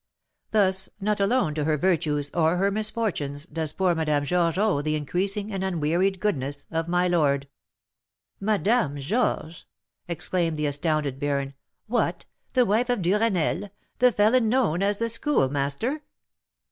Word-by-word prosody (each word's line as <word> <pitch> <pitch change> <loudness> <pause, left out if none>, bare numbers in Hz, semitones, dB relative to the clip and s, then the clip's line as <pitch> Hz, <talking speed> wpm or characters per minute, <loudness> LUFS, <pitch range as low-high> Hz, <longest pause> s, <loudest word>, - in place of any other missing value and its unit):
Thus, 190 -3 +2
not 210 +1 0
alone 200 -5 +2
to 150 -1 -2
her 155 -1 +1
virtues 150 -4 0
or 165 +1 +2
her 195 +2 +2
misfortunes 200 -9 -2
does 160 -1 -3
poor 185 +1 +1
Madame 150 -3 0
Georges 170 +1 +1
owe 205 -8 +2
the 155 +1 -1
increasing 195 +7 -1
and 190 -1 -2
unwearied 180 +2 0
goodness 145 -8 -2
of 165 0 -2
my 180 +1 +2
lord." 140 -5 +1 0.9
"Madame 210 - +1
Georges!" 160 - -2 0.4
exclaimed 170 -1 -1
the 150 - -1
astounded 145 -2 -1
baron. 140 -1 -1 0.3
"What, 235 +2 -1 0.3
the 250 -1 +5
wife 230 +5 +1
of 245 -7 0
Duresnel, 200 -1 +1 0.3
the 250 0 +5
felon 220 +2 +3
known 220 -9 +1
as 200 +1 +1
the 230 - -1
Schoolmaster?" 220 - 0
180 Hz, 140 wpm, -25 LUFS, 150-210 Hz, 0.9 s, the